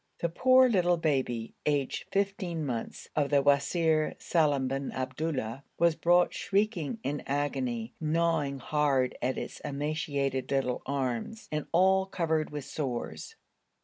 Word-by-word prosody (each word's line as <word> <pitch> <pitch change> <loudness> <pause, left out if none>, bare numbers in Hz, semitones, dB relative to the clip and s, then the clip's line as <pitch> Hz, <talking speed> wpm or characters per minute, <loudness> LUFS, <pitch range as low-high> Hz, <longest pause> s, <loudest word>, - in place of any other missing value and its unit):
The 170 - -1
poor 255 +8 +5
little 180 -6 +3
baby, 130 -8 -1
aged 145 -3 0
fifteen 195 -5 -1
months, 120 -4 -4
of 145 -2 +1
the 140 -1 +3
Wazir 155 +2 +2
Salim 145 -5 +1
bin 135 +1 -3
Abdullah 130 -2 -3
was 170 -1 +4
brought 175 +2 +3
shrieking 200 -1 0
in 145 +1 -2
agony, 130 -5 -2
gnawing 160 -3 +1
hard 135 -2 +1
at 130 +2 0
its - - -5
emaciated 140 -2 -2
little 135 -2 0
arms, 135 - -3
and 150 -1 -2
all 190 +2 +4
covered 160 -4 0
with 145 -2 -6
sores. 135 -4 -4
150 Hz, 130 wpm, -29 LUFS, 135-170 Hz, -, poor